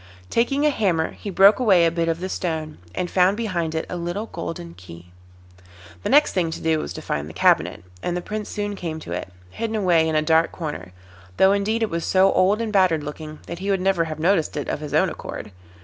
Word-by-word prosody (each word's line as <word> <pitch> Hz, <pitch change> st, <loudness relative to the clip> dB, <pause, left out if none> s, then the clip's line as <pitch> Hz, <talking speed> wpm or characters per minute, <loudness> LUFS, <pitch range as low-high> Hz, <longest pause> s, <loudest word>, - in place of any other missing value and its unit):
Taking 275 Hz, +5 st, +1 dB
a 300 Hz, -, +4 dB
hammer 180 Hz, -, 0 dB
he 205 Hz, -, -8 dB
broke 195 Hz, +4 st, +6 dB
away 195 Hz, -9 st, +5 dB
a 165 Hz, -, +3 dB
bit 165 Hz, 0 st, 0 dB
of 165 Hz, +1 st, -2 dB
the 185 Hz, -, -2 dB
stone, 160 Hz, -4 st, -3 dB, 0.2 s
and 180 Hz, -, -1 dB
found 185 Hz, +3 st, +3 dB
behind 175 Hz, -8 st, -2 dB
it 160 Hz, -, -1 dB
a -, -, -5 dB
little 175 Hz, +5 st, -3 dB
golden 165 Hz, -, -6 dB
key. 85 Hz, 0 st, -13 dB, 0.9 s
The -, -, -3 dB
next 295 Hz, +1 st, +5 dB
thing 175 Hz, -3 st, +1 dB
to 160 Hz, -, -5 dB
do 160 Hz, -1 st, +1 dB
was -, -, -5 dB
to -, -, -8 dB
find 75 Hz, +1 st, -3 dB
the -, -, -10 dB
cabinet, -, -, +2 dB, 0.2 s
and 175 Hz, 0 st, -2 dB
the -, -, -3 dB
Prince 210 Hz, +2 st, -5 dB
soon 205 Hz, -1 st, -3 dB
came 165 Hz, -4 st, -5 dB
to -, -, -9 dB
it, 90 Hz, +1 st, -4 dB, 0.2 s
hidden 225 Hz, -, -3 dB
away 175 Hz, -6 st, +3 dB
in 160 Hz, -, -1 dB
a 155 Hz, -, +3 dB
dark 160 Hz, +1 st, +3 dB
corner, 145 Hz, -, -6 dB, 0.5 s
though 190 Hz, -, +6 dB
indeed 210 Hz, +3 st, +1 dB
it 220 Hz, -, -1 dB
was 170 Hz, 0 st, -2 dB
so 190 Hz, +1 st, +4 dB
old 200 Hz, +4 st, +3 dB
and 220 Hz, -1 st, -4 dB
battered 180 Hz, -6 st, +3 dB
looking 155 Hz, +1 st, -8 dB
that 170 Hz, +1 st, -7 dB
he 195 Hz, +2 st, -3 dB
would 195 Hz, -1 st, +2 dB
never 190 Hz, -3 st, +2 dB
have 155 Hz, -1 st, -5 dB
noticed 165 Hz, -1 st, +1 dB
it 145 Hz, -, -3 dB
of -, -, -2 dB
his 150 Hz, -1 st, -4 dB
own -, -, +4 dB
accord. -, -, -7 dB
175 Hz, 235 wpm, -23 LUFS, 160-200 Hz, 0.9 s, broke